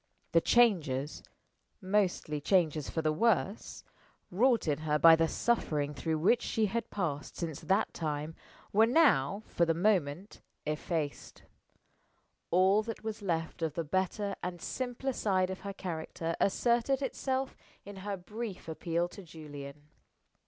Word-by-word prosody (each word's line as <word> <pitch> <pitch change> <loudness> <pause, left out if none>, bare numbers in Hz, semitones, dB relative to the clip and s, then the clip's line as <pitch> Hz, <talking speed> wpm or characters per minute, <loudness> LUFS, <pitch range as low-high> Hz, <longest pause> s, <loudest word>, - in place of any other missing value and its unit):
The 165 - +5
changes 160 - +2 0.6
mostly 185 -6 0
changes 155 -4 +2
for 160 - -2
the 155 0 +2
worse 210 +2 0 0.5
wrought 235 +2 +3
in 150 -1 +1
her 155 -1 +1
by 165 +1 +8
the 165 0 +2
suffering 150 -10 0
through 160 +2 -2
which 215 +10 +3
she 220 -2 0
had 230 +3 -2
passed 155 -7 -3
since 160 -4 -4
that 195 +3 +1
time 150 -1 -3 0.4
were 220 +2 +5
now 220 - +3
(for 170 - 0
the 165 -1 +2
moment) 180 -1 0 0.2
effaced. 150 0 -3 1.1
All 190 +4 +4
that 225 0 -7
was 220 -1 -4
left 165 -4 -2
of 160 -3 -1
the 165 - -1
better 190 +5 -1
and 180 -1 -4
simpler 255 +6 -3
side 190 -5 +1
of 190 - -6
her 200 - -5
character 165 -2 -4
asserted 240 +6 +2
itself 265 0 -2 0.3
in 200 0 -9
her 200 +1 -4
brief 210 +1 -7
appeal 170 +1 -1
to 200 - -10
Julian. 145 -4 -10
180 Hz, 140 wpm, -31 LUFS, 155-215 Hz, 1.1 s, by